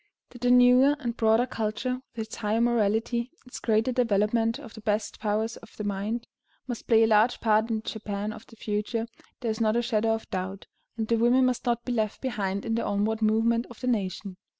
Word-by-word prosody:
That 245 - -13
the 245 - +2
newer 250 +3 +6
and 240 -5 -4
broader 225 +1 +3
culture, 245 +2 -3
with 220 -1 -3
its - - -9
higher 215 +1 0
morality, 235 +1 +1 0.2
its 250 - -8
greater 220 +2 +1
development 230 -1 +1
of 245 -6 -11
the 220 - -10
best 210 0 -1
powers 220 +1 -1
of 225 - -16
the 210 - -4
mind, 205 +4 -2 0.4
must 245 -3 -6
play 225 -1 +5
a - - +6
large 220 +2 +3
part 220 0 +2
in 220 -1 -1
the - - -20
Japan 210 -1 -4
of 220 0 -12
the 225 - -16
future, 220 +1 -2 0.4
there 235 -3 0
is 220 +1 -4
not 215 0 +2
a 240 - +2
shadow 225 -2 +1
of 225 - -8
doubt, 190 +1 -4 0.3
and 220 -1 -2
the 230 - +2
women 245 +3 +4
must 250 -1 -1
not 235 0 0
be 250 - -1
left 215 -3 -1
behind 200 -6 -2
in 225 - -1
the 230 - 0
onward 215 +2 0
movement 225 +2 +2
of 240 - -12
the 255 - -5
nation. 195 -5 -2
225 Hz, 220 wpm, -27 LUFS, 215-240 Hz, 0.4 s, newer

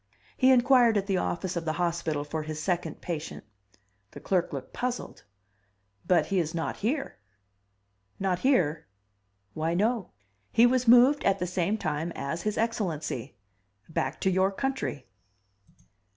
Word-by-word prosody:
He 260 - +4
inquired 245 -3 +5
at 195 - 0
the 195 -2 0
office 180 +1 -2
of 170 - -2
the 155 -1 -1
hospital 170 -4 -1
for 155 +2 -4
his 155 0 -5
second 175 +2 -2
patient. 165 -3 -5 0.7
The - - -9
clerk 180 -3 0
looked 135 -3 -7
puzzled. 250 0 -4 0.8
"But 180 -2 +4
he 195 -2 0
is 160 -1 -2
not 165 - -3
here...." 270 +7 -2 1.0
"Not 185 -2 0
here?" 175 - +1 0.7
"Why, 160 +2 -1
no. 220 +2 0 0.4
He 230 - +5
was 250 0 +2
moved 250 +5 +6
at 195 0 +3
the 180 - -2
same 180 +3 -1
time 160 -3 -2
as 165 +5 -3
His 210 +2 -2
Excellency 175 - -2 0.6
back - - -2
to 190 - +2
your 190 +1 +2
country." 265 - -3
185 Hz, 145 wpm, -28 LUFS, 165-230 Hz, 1.0 s, moved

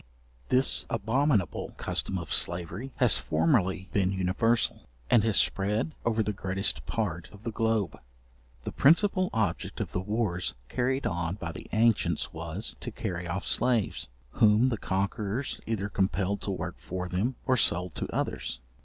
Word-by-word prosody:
This 130 +1 +3
abominable 115 - +1
custom 95 - -2
of 85 - -4
slavery 90 +9 0
has 125 -5 +4
formerly 95 - +1
been 95 -2 +2
universal, 95 +5 +1 0.2
and 110 - +6
has 110 -3 +2
spread 105 +10 +1
over 115 -1 +1
the 105 - -1
greatest 95 +1 0
part 85 -7 -2
of 105 0 -14
the 115 - -3
globe. 110 -2 0 0.6
The - - -4
principal 185 +5 +4
object 105 -7 -1
of - - -3
the - - -1
wars 95 - -1
carried 130 +2 0
on 85 +1 -1
by 85 -4 -5
the - - -9
ancients 110 -7 +2
was, - - -4
to - - -5
carry 85 -1 -4
off 95 +3 -3
slaves, 120 - +1 0.2
whom 110 - +5
the 115 - -1
conquerors 100 +6 -2
either 105 -3 -1
compelled 100 0 0
to - - -4
work 90 -2 -4
for 90 0 -4
them, 100 +9 -1
or 130 -1 +3
sold 90 -7 +2
to - - -2
others. 65 - -2
105 Hz, 155 wpm, -29 LUFS, 95-115 Hz, 0.6 s, and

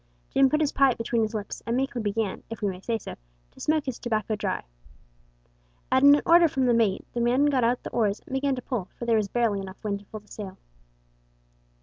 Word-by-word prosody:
Jim 270 0 +4
put 305 +3 +1
his 295 - +1
pipe 270 -3 +3
between 230 0 0
his 220 0 -1
lips, 210 -1 -5
and 235 +1 0
meekly 260 -2 -1
began, 210 -1 -2
if 225 -1 -7
we - - +2
may 185 -2 -4
say 225 +4 -2
so, - - -8 0.4
to - - -19
smoke 310 -1 +1
his 260 -3 -4
tobacco 215 -2 -1
dry. 205 -3 -2 1.3
At 260 - +4
an 285 +1 +7
order 340 0 +7
from 270 -3 0
the 245 - +4
mate 220 -5 +1
the 240 - -1
men 250 +4 +3
got 270 -4 +2
out 240 +2 +1
the - - -6
oars 210 -3 +1
and - - -10
began 270 0 +1
to 250 - -7
pull, 240 -9 -3
for 235 - -5
there 230 -1 +3
was 210 -2 0
barely 225 -2 0
enough 190 -1 -10
wind 200 -2 -2
to 205 - -18
fill 215 +1 -9
the 210 - -27
sail. 195 -3 -8
235 Hz, 235 wpm, -26 LUFS, 210-265 Hz, 1.3 s, an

